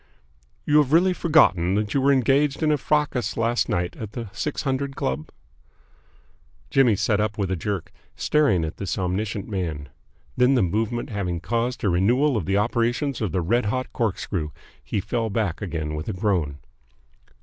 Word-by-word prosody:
"You 150 - +4
have 145 -1 +3
really 180 +3 +5
forgotten 100 - +3
that 105 0 -1
you 140 - +2
were 140 +1 +4
engaged 135 +3 +2
in 155 - +3
a 150 - +3
fracas 150 -3 0
last 115 +1 +1
night 85 0 -1
at 110 -2 -7
the 115 -4 -5
Six 150 - -3
Hundred 135 0 -2
Club?" 65 +4 -3 1.4
Jimmy 130 -6 +4
sat 105 +1 +1
up 105 0 -1
with 100 -3 -1
a - - +1
jerk, 95 +1 -4 0.2
staring 125 - +2
at 80 - -6
this 100 - -3
omniscient 95 +2 -2
man. 80 -9 -4 0.5
Then 125 +2 +4
the 125 - +3
movement 110 +7 -1
having 90 -5 -2
caused 120 +6 -2
a 105 - +3
renewal 120 +11 +2
of 100 -7 -2
the 100 +1 +2
operations 120 +5 0
of 105 -6 -1
the 90 - 0
red 115 +7 +1
hot 130 +4 -2
corkscrew, 95 -7 -2 0.3
he 100 - -2
fell 115 +2 -2
back 100 -5 -1
again 80 -6 -3
with 75 +4 -4
a - - -2
groan. 90 -8 0
110 Hz, 175 wpm, -24 LUFS, 90-130 Hz, 1.4 s, really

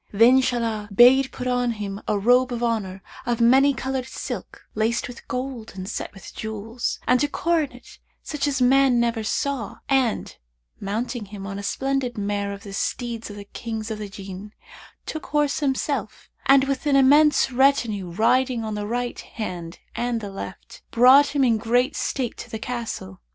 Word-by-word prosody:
Then 235 +5 +6
Shahlan 230 -4 -1
bade 255 +5 +6
put 255 - -6
on 245 -1 +1
him 205 -2 -5
a 210 - +1
robe 245 +5 +3
of 240 0 -3
honour 200 -5 -2 0.2
of 240 -1 -1
many 265 +4 +5
coloured 265 -1 -3
silk, - - -7
laced 225 +2 0
with 245 -1 -11
gold 250 -3 -5
and 185 -1 -6
set - - -4
with 195 - -12
jewels, 220 +2 -4
and 250 +2 +4
a - - +2
coronet 295 -5 -2 0.2
such 295 -1 -2
as 275 -2 0
man 265 -1 +4
never 235 -1 0
saw, 255 +1 -2
and, 265 -4 +1 0.4
mounting 225 +3 -3
him 195 -1 -9
on 195 0 -5
a - - -4
splendid 265 +3 -1
mare 200 0 -2
of 200 0 -8
the 200 - -9
steeds 235 +2 -3
of 205 - -8
the 205 - -8
Kings 220 +1 -5
of 215 - -4
the 210 -1 -6
Jinn, 195 +1 -9 0.5
took 315 - -6
horse 295 -1 +1
himself 270 -5 -2 0.2
and, 275 0 +7
with 275 +2 -2
an 285 - +3
immense 285 +1 +5
retinue 245 -8 +2
riding 240 +6 +2
on 215 -1 -3
the 210 0 -3
right 245 +2 -2
hand 180 -6 -6 0.2
and 240 -1 -1
the 205 -2 -7
left, 195 - -9
brought 265 +5 +6
him 280 - +3
in 230 -4 +3
great 245 +3 +1
state 255 -4 -2
to - - -8
the 220 - -4
Castle. 225 - -5
235 Hz, 175 wpm, -24 LUFS, 210-265 Hz, 0.5 s, and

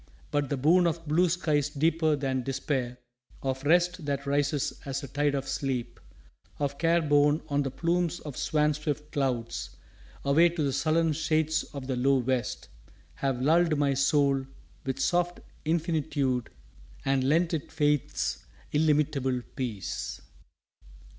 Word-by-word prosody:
But 145 -1 0
the 140 - -1
boon 170 +6 +4
of 165 -1 -3
blue 170 +4 +3
skies 155 -5 +1
deeper 160 +1 +2
than 135 -2 -1
despair, 130 -1 -2 0.5
Of 135 0 -2
rest 175 +3 +3
that 140 0 -2
rises 145 0 0
as 135 0 -4
a - - -5
tide 145 +2 0
of 135 0 -3
sleep, 125 -4 -3 0.6
Of 140 -1 -2
care 170 0 +3
borne 145 +1 +3
on 145 0 +1
the 135 - -1
plumes 170 +5 0
of 150 -4 -7
swan 150 0 +1
swift 150 0 -4
clouds 125 -5 -2 0.5
Away 160 +5 +5
to 165 -2 -2
the 140 -2 0
sullen 160 +3 +2
shades 160 0 +1
of 140 -2 -8
the 130 -1 -2
low 135 +2 +3
west, 130 -1 -1 0.5
Have 135 -2 -2
lulled 165 +1 +4
my 140 -1 +2
soul 140 -1 +2 0.4
with 130 -1 -2
soft 175 0 +1 0.3
infinitude 150 - 0 0.6
And 135 -1 +2
lent 165 +6 +2
it 155 - -3
faith's 150 -2 0 0.3
illimitable 145 -4 +1
Peace. 115 -7 -4
145 Hz, 140 wpm, -28 LUFS, 135-160 Hz, 0.6 s, Away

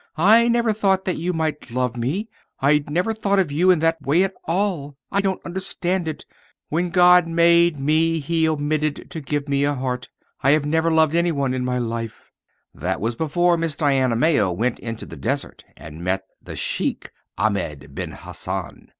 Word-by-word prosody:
I 220 +8 +6
never 235 -2 +2
thought 195 -3 +1
that 185 - -1
you 175 +3 -1
might 155 -5 -3
love 125 0 -1
me. 140 - -2 0.3
I 145 +2 +3
never 180 +9 0
thought 200 -2 0
of 185 -7 +1
you 170 +6 +2
in 180 - +6
that 165 0 +1
way 155 +7 +3
at 195 0 -1
all. 165 -6 -1
I 200 - +2
don't 195 -1 -2
understand 180 0 -2
it. 155 - -5 0.4
When 175 +3 0
God 180 -1 +6
made 170 -1 +4
me 160 +3 +2
he 160 +2 +1
omitted 150 0 -2
to 160 - -5
give 145 0 -3
me 140 0 +1
a 145 0 +1
heart. 125 -1 -3 0.3
I 135 +2 +4
have 150 -1 +2
never 160 +2 +1
loved 160 -1 +3
any 170 +1 +2
one 140 -4 -1
in 130 -1 -2
my 125 0 -1
life." 115 -2 -5 0.4
That 90 +7 -3
was 115 +2 -2
before 170 +4 +2
Miss 165 -3 -2
Diana 135 -5 +2
Mayo 115 - +2
went 115 +8 -1
into 115 -1 -6
the - - -10
desert 70 - -3
and 75 +3 -10
met 95 +2 -1 0.2
the - - -9
Sheik - - -2 0.3
Ahmed 75 -10 -2
Ben - - -5
Hassan. - - -6
155 Hz, 185 wpm, -22 LUFS, 130-175 Hz, 0.4 s, I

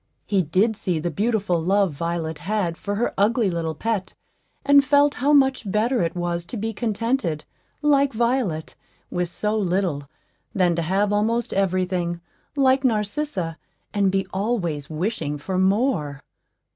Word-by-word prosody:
He 200 -3 +2
did 190 +7 +1
see 180 -4 -2
the 170 +2 -2
beautiful 200 -2 0
love 195 -1 +2
Violet 165 0 -3
had 185 -1 -1
for 205 +4 -4
her 235 +4 0
ugly 215 0 +3
little 165 -2 -2
pet, 200 +1 -2 0.5
and 280 0 +6
felt 285 0 +4
how 285 +3 +3
much 265 -7 +3
better 230 +5 +1
it 170 0 -1
was 175 -1 -2
to 235 - -4
be 225 +2 -3
contented, 220 - -1 0.4
like 280 -2 +4
Violet, 230 -9 -1 0.4
with 175 -1 -1
so 210 +4 -2
little, 180 -8 -1 0.5
than 180 -3 +3
to 170 - 0
have 195 +5 +1
almost 225 +3 0
every 185 -1 +1
thing, 175 -2 -2 0.4
like 265 -1 +3
Narcissa, 210 - -1 0.3
and 200 -2 +2
be 195 0 0
always 190 -8 -2
wishing 160 -2 -2
for 185 +6 -3
more. 190 - +1
195 Hz, 150 wpm, -23 LUFS, 170-230 Hz, 0.5 s, and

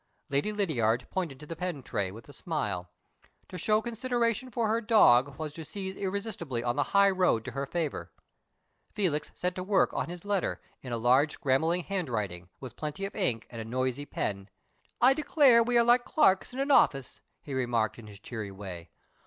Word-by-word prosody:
Lady 145 +9 0
Lydiard 130 - 0
pointed 165 -8 -3
to 150 - -10
the 165 - -6
pen 165 -5 -4
tray, 100 -5 -2
with 110 +5 -12
a 145 - -13
smile. 100 - -3 0.6
To 180 - -7
show 215 +5 +2
consideration 240 0 -1
for 235 -3 -1
her 225 +2 +1
dog 140 - +5
was 155 -1 -5
to 160 - -8
seize 190 +3 -6
irresistibly 190 - -3
on 120 0 0
the 145 - +1 0.2
high 200 0 +6
road 180 - +2
to 130 - -5
her 140 +2 -3
favor. 165 -1 -3 0.8
Felix 175 -8 -1
set 180 0 -1
to 185 - -5
work 195 0 +2
on - - -2
his 175 +2 -8
letter, 200 -3 -1 0.2
in 130 - -8
a 120 - -1
large 130 +6 +3
scrambling 160 +4 +1
handwriting, 105 - -3
with 125 -3 -9
plenty 150 +6 -4
of 195 - -7
ink 125 - 0
and 115 -1 -6
a - - -4
noisy 130 +4 -2
pen. 100 -1 -3 0.5
"I 255 +2 +6
declare 275 -4 +5
we 240 +1 +2
are 235 - +6
like 240 +1 +4
clerks 195 - +3
in 250 - -9
an 275 +1 0
office," 135 - +3 0.2
he 145 - -7
remarked, 120 -4 0
in 110 - -11
his 100 -2 -12
cheery 110 -1 -6
way. 95 -4 -8
155 Hz, 195 wpm, -29 LUFS, 120-200 Hz, 0.8 s, high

